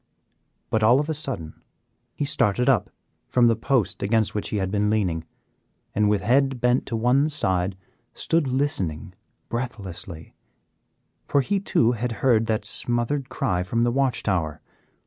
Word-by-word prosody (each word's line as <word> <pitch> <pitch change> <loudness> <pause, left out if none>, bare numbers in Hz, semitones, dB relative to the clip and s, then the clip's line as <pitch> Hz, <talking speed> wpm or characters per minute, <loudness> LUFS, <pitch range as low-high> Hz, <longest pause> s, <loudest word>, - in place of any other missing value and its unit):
But 110 - +2
all 120 +5 +5
of 150 +2 -2
a - - +1
sudden 130 - -5 0.5
he 145 - -1
started 125 -3 +1
up 130 -8 +3 0.4
from 125 -1 +3
the 115 -1 +4
post 120 0 0
against 110 +1 +1
which 105 - -2
he 105 - -2
had 95 -1 -1
been 105 0 +1
leaning, 90 -7 0 0.7
and 105 0 +2
with 105 -2 +1
head 135 +3 +2
bent 125 +1 +1
to 115 - -2
one 125 +6 +3
side, 95 -10 -1 0.3
stood 165 -3 0
listening 125 - -1 0.3
breathlessly, 100 -9 -5 0.9
for 140 - +3
he 200 +8 0
too 120 - +2
had 120 0 -2
heard 115 -3 +4
that 110 -2 -1
smothered 120 +5 0
cry 90 -8 -1
from 115 +6 0
the 120 - +2
watch 130 -2 0
tower. 80 -6 -1
115 Hz, 155 wpm, -24 LUFS, 100-130 Hz, 0.9 s, all